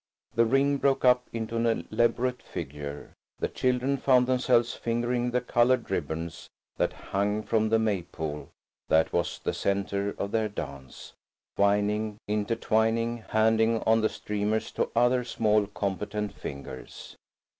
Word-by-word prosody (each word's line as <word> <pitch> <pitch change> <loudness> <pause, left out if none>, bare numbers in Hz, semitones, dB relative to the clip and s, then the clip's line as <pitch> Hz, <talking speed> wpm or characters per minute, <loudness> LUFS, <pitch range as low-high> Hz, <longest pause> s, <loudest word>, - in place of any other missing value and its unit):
The 115 +1 +4
ring 135 +4 +3
broke 135 -1 +1
up 125 0 +4
into 115 0 -3
an 115 -1 0
elaborate 120 +3 +1
figure. 70 +1 -7 0.2
The - - -1
children 130 +2 0
found 130 -2 +4
themselves 125 -2 +2
fingering 120 +1 -1
the 125 +1 0
coloured 120 -1 +2
ribbons 80 -1 -4 0.3
that - - +1 0.2
hung 105 +2 +1
from 110 0 +1
the 115 - +4
Maypole 85 -8 -3 0.4
that 80 0 +3
was - - 0
the - - -3
centre 100 0 -1
of 100 - -3
their 110 -1 +1
dance, 70 -9 -8 0.4
twining, 105 +1 +1
intertwining, 115 +2 0
handing 110 +1 +3
on 110 0 +4
the 110 - +2
streamers 105 +1 -2
to - - -1
other 120 +1 +3
small, 110 -3 +1
competent 105 +1 -3
fingers. 70 -6 -8
110 Hz, 135 wpm, -28 LUFS, 100-120 Hz, 0.4 s, The